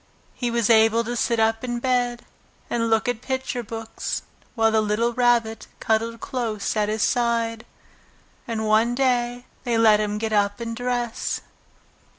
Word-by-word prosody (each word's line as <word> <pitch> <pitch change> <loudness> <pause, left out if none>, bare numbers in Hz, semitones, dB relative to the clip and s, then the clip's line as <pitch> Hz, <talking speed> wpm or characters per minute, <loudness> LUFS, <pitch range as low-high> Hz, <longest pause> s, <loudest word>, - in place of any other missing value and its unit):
He 245 - -2
was 235 -1 +2
able 225 +1 +5
to 240 +1 -4
sit 235 -1 0
up 225 +1 +2
in 240 -1 -2
bed 245 -1 0 0.5
and 230 -1 0
look 225 +3 +2
at 245 -2 -1
picture 260 -1 -3
books, 225 0 -5 0.3
while 225 -1 +3
the 220 0 +3
little 215 +3 0
Rabbit 235 -2 +1
cuddled 225 +1 0
close 225 -6 -3
at 210 -1 +1
his 215 0 0
side. 230 -2 0 0.8
And 225 -2 -2
one 220 +3 +3
day, 245 -2 0 0.2
they 240 -3 0
let 220 -2 +5
him 210 0 -1
get 220 0 -2
up 205 0 +1
and 230 -1 -4
dress. 245 -1 -2
230 Hz, 160 wpm, -23 LUFS, 220-240 Hz, 0.8 s, able